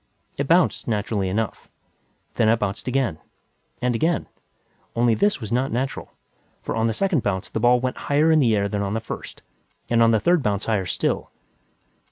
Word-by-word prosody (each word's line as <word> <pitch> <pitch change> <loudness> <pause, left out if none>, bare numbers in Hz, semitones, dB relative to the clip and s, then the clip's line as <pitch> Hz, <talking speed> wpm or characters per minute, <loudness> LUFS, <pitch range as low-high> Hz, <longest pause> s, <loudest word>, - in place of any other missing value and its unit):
It 140 - -2
bounced, 170 +2 +2
naturally 105 -3 -1
enough. 110 +3 -3 0.6
Then 110 -2 +2
it 115 - +4
bounced 105 +1 -3
again. 125 -11 0 0.6
And 125 0 +2
again. 160 +7 0 0.7
Only 120 0 +3
this 205 - +1
was 110 -3 -7
not 130 +3 0
natural, 130 +3 -3 0.5
for - - -3
on 115 0 +1
the 110 - 0
second 190 - +1
bounce 95 -3 -2
the - - -2
ball 120 +2 +4
went 130 0 -2
higher 150 +3 +2
in 160 - +5
the 115 -6 +3
air 100 -1 +1
than 100 0 -2
on 100 +1 -2
the - - 0
first, 115 - -8 0.5
and 115 -1 +4
on 115 - +6
the 110 -1 +3
third 175 +9 +3
bounce 105 -6 -1
higher 100 -5 0
still. 90 - -1
115 Hz, 190 wpm, -23 LUFS, 105-135 Hz, 0.7 s, on